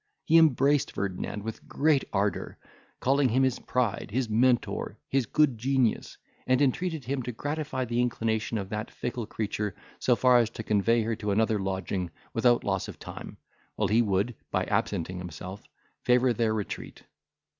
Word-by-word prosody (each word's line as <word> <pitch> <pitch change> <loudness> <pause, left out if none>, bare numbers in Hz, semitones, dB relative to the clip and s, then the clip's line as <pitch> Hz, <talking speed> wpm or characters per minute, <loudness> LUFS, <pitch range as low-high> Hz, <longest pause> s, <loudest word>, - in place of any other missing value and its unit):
He 165 - +6
embraced 145 -2 +3
Ferdinand 100 +1 -3
with 110 0 -7
great 150 -2 +2
ardour, 100 +1 -1 0.4
calling 135 0 +3
him 130 +4 +3
his 130 -2 +1
pride, 120 -6 -1
his 125 +2 0
Mentor, 120 +3 +1
his 135 -4 +1
good 150 -7 +2
genius, 130 -1 0 0.3
and 130 0 +3
entreated 150 +1 0
him 135 +1 -1
to 125 0 -4
gratify 145 +1 -3
the 120 +1 0
inclination 115 -2 -1
of 95 -2 -4
that 105 +1 -4
fickle 120 -2 -4
creature 105 -2 -3 0.2
so 125 - +3
far 125 0 +5
as 115 -2 +2
to 110 - -7
convey 110 +2 +2
her 115 +1 -1
to 105 -2 -3
another 110 +1 +2
lodging, 95 -1 -2 0.2
without 120 -1 +3
loss 95 -2 -1
of - - -9
time, - - -9 0.4
while - - 0
he 110 +3 +4
would, 100 +2 +1 0.2
by - - 0
absenting 90 +2 -1
himself, 90 +3 -7 0.4
favour 125 0 +3
their 115 0 +1
retreat. 105 -2 -5
115 Hz, 165 wpm, -28 LUFS, 105-130 Hz, 0.4 s, He